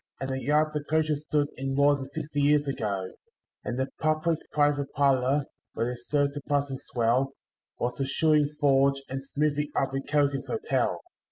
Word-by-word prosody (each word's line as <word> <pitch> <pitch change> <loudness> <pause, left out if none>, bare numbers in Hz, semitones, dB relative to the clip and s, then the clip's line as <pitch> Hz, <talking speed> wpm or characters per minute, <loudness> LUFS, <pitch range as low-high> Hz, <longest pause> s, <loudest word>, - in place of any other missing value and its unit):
And 135 0 -3
the 130 0 -2
yard 150 +4 +2
the 150 -1 -2
coaches 155 -1 0
stood 145 -1 +1
in 135 +1 -2
more 140 +1 +5
than 135 -1 -6
sixty 145 +1 -3
years 145 0 +3
ago; 100 -8 -2 0.5
And 125 - -3
the 130 +1 -1
public 155 +1 +1
private 145 -1 +1
parlour, 135 0 +2 0.3
where 120 +2 0
they - - -4
serve 140 +4 0
the 145 - -5
passing 140 -2 0
swell, 125 +3 0 0.4
Was 125 +1 -2
the 135 - -1
shoeing 150 +1 +3
forge 140 -1 +3
and 135 +1 -4
smithy 145 +1 -1
up 135 0 0
at 135 0 -3
Callaghan's 145 -2 +1
Hotel. 445 0 0
140 Hz, 175 wpm, -27 LUFS, 135-150 Hz, 0.5 s, more